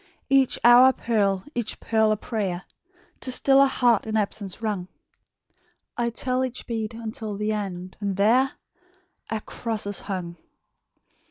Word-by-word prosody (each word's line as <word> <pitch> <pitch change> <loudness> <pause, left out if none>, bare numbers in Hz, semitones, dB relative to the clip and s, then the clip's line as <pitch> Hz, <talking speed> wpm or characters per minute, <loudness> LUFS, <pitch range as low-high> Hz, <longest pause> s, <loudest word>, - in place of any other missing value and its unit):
"Each 270 -2 +4
hour 245 +2 +8
a - - 0
pearl, 200 -6 0
each 235 -3 -3
pearl 220 -1 +2
a 215 - +1
prayer, 195 -5 -3 0.6
To 255 - -2
still 270 +2 +4
a 275 - +6
heart 240 -5 +2
in 220 0 0
absence 200 -2 -3
wrung; 210 -5 -3 1.1
I 240 -1 0
tell 255 +2 -1
each 255 -1 -4
bead 225 -2 -4
unto 220 -2 -5
the 210 +1 -1
end, 185 -3 -5
and 200 -2 -2
there 250 +7 +3 0.8
A 220 -1 -2
cross 225 -2 -3
is 205 -1 -2
hung!" 180 -4 -5
220 Hz, 150 wpm, -25 LUFS, 200-240 Hz, 1.1 s, hour